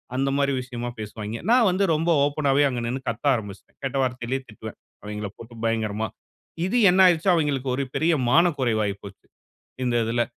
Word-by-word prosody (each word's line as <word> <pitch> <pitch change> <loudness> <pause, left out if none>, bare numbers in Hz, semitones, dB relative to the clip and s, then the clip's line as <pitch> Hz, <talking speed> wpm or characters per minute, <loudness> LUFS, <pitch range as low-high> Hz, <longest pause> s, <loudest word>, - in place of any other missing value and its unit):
அந்த 135 +1 +1
மாரி 140 0 +2
விஷயமா 120 -1 -5
பேசுவாய்ங்க. 110 +1 -6
நான் 240 -2 +5
வந்து 185 +2 +1
ரொம்ப 165 +3 -1 0.2
ஓப்பனாவே 145 -1 +2
அங்க 125 -2 -3
நின்னு 130 +3 -3
கத்த 115 +4 -5
ஆரம்பிச்சுட்டேன். 105 -4 -8
கெட்ட 135 0 -3
வார்த்தையிலேயே 125 +1 -2
திட்டுவேன், 110 0 -9 0.3
அவைங்களைப் 105 -1 -6
போட்டு 115 +1 -12
பயங்கரமா. 110 -1 -1 0.6
இது 195 +7 0
என்ன 185 +2 +3
ஆயிருச்சு? 175 +1 +3
அவைங்களுக்கு 145 -5 -1
ஒரு 140 - -1
பெரிய 165 +2 +2 0.2
மான 170 +6 +5
குறைவு 115 -4 +1
ஆயி 100 -1 -2
போச்சு, 100 -1 -12 0.6
இந்த 120 -1 +1
இதில. 115 +2 0
125 Hz, 175 wpm, -24 LUFS, 110-145 Hz, 0.6 s, நான்